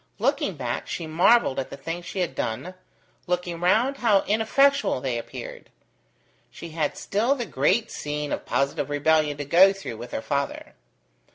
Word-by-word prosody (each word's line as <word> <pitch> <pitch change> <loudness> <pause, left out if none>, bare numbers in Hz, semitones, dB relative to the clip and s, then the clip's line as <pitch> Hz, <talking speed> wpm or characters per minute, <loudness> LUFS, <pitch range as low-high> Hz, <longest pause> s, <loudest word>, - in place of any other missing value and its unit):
Looking - - 0
back, - - -4
she 170 - -4
marvelled 165 - +3
at 130 - -4
the - - -8
things 170 +4 -6
she 190 - -3
had 170 -6 -1
done. 130 +10 -3 0.5
Looking 175 -1 -2
round, 230 +10 +2
how 210 -6 +3
ineffectual 275 - +2
they 125 -2 -2
appeared! - - -9 0.8
She 170 - -10
had 155 -2 -2
still 230 +7 +1
the 245 -4 -3
great 185 - +1
scene 150 0 -4
of - - -2
positive 140 +1 -1
rebellion 150 0 +2
to 145 - -4
go 180 +7 +6
through 195 - -7
with 120 +2 -9
her - - -4
father. 140 0 -3
170 Hz, 165 wpm, -25 LUFS, 145-200 Hz, 0.8 s, go